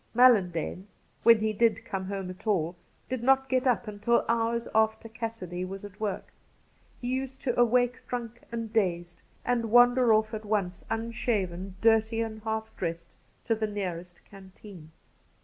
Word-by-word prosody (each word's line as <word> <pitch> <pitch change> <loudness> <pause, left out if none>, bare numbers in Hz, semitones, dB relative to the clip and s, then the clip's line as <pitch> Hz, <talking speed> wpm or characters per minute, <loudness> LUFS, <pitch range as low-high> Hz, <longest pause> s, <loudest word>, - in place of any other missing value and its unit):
Mallan 240 -7 +6
dane, 175 +3 -5 0.3
when 230 -2 +6
he 215 0 +1
did 230 +1 +2
come 190 -1 -4
home 195 -1 -4
at 185 +4 -13
all, 175 -4 +1 0.3
did 255 -2 -3
not 265 +1 +3
get 260 0 +1
up 240 -2 +1
until 210 +3 +1
hours 230 0 0
after 220 +1 +2
Cassidy 225 -6 -5
was 195 +2 -6
at 205 +1 -12
work. 210 -3 -4 0.7
He 245 - -5
used 265 +1 -3
to 245 -3 0
awake 245 +1 +3
drunk 240 -1 -5
and 230 -1 -5
dazed, 175 -5 -1 0.2
and 235 -2 0
wander 245 +1 +6
off 215 +1 +3
at 215 0 -4
once, 200 -4 -2
unshaven, 210 -5 -2
dirty 225 0 +3
and 220 -1 -3
half 220 0 -4
dressed, 170 -1 -4 0.3
to 230 - +2
the 220 -1 -1
nearest 180 -4 -5
canteen. 190 -3 -13
220 Hz, 160 wpm, -28 LUFS, 190-235 Hz, 0.7 s, Mallan